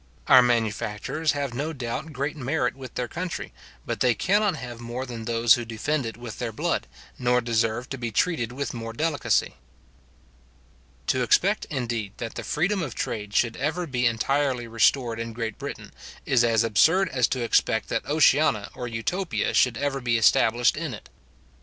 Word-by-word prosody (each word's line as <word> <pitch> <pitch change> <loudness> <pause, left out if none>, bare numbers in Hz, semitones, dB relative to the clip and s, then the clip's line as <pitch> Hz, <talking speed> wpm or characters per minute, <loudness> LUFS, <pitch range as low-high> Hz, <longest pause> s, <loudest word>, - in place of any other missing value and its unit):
Our 130 - +8
manufacturers 120 +5 0
have 140 -3 -3
no 150 +6 -3
doubt 135 +4 -4
great 140 +2 -3
merit 135 -2 -1
with 130 -2 -10
their 125 - -2
country, 175 +4 -5 0.3
but - - -3
they 125 -2 +3
cannot 205 - +2
have 120 -4 -7
more 120 +2 -5
than 115 -3 -7
those 115 0 +4
who 120 - 0
defend 120 +4 -2
it 115 - -7
with 120 -2 -8
their 120 -2 -2
blood, 110 - -1 0.3
nor 125 -1 +3
deserve 115 +1 0
to 135 - -5
be 120 -1 -2
treated 120 0 0
with 140 +3 -4
more 115 -1 -6
delicacy. 155 +4 0 1.5
To - - +1
expect, - - +2
indeed, 120 -7 -3
that 115 -1 -5
the - - -5
freedom 185 +6 0
of 140 -8 -4
trade 105 -2 -4
should 115 +1 +2
ever 155 +6 -1
be 125 -5 +1
entirely 125 +1 0
restored 115 +1 +2
in 115 0 -4
Great 115 -1 -4
Britain, - - -7 0.3
is 125 -3 +3
as 115 -1 +3
absurd 160 - +4
as 125 -3 +2
to 130 -2 -2
expect 115 - +1
that - - -1
an - - -12
Oceana - - +3
or 125 - -5
Utopia 165 - -2
should 125 -3 +3
ever 140 0 -1
be 120 -1 +1
established 115 +2 +4
in 155 -6 -3
it. - - -14
125 Hz, 180 wpm, -25 LUFS, 115-140 Hz, 1.5 s, Our